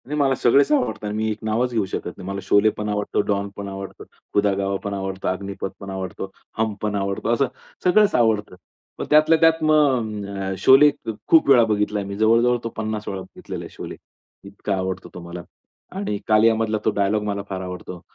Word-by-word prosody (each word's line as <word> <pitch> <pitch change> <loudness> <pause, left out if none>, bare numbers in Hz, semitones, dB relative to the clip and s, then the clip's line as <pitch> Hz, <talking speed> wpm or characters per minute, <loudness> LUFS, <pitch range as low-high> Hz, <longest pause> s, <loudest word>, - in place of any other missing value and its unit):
नाही 150 +2 -3
मला 135 -2 +3
सगळेच 140 - +3
आवडतात 280 - 0
आणि 105 - -3
मी 110 0 0
एक 105 - -4
नावच 115 +3 0
घेऊ 110 -4 +1
शकत 95 -2 -5
नाही. 90 - -9
मला 100 0 -3
शोले 100 +1 +4
पण 105 0 -3
आवडतो, 105 0 0
डॉन 100 -1 -1
पण 100 -1 -6
आवडतो, 95 0 -8 0.3
खुदा 100 -1 +3
गवा 100 0 -1
पण 100 - -3
आवडतो, 95 -1 -4
अग्निपथ 100 +1 -3
पण 100 - -8
आवडतो, 95 0 -5 0.3
हम 110 -1 0
पण 105 -1 -1
आवडतो 100 +2 -2
असं 135 +3 +2 0.4
सगळंच 205 +3 +4
आवडतं. 110 -5 +1 0.4
पण - - -4
त्यातल्या 155 +2 +5
त्यात 165 -1 +4
मग 130 -9 +2
अ, 95 0 -2
शोले 135 +7 +7
ख - - -10 0.2
खूप 160 -3 +5
वेळा 125 -4 +7
बघितला 105 -1 0
आहे 100 - -5
मी. 100 - -5
जवळजवळ 115 +3 +4 0.2
50 110 -1 -4
वेळा 95 -1 -4
बघितलेला 95 - -8
आहे - - -9
शोले. - - -7 0.5
इतका 100 0 -3
आवडतो 95 0 -4
तो - - -8
मला 85 0 -8 0.5
आणि 195 - -2
कालिया 110 +1 +5
मधला 110 -1 0
तो - - +4
डायलॉग 105 +1 +1
मला 100 -1 -2
फार 95 -1 -4
आवडतो. 90 -1 -7
105 Hz, 200 wpm, -22 LUFS, 100-120 Hz, 0.5 s, शोले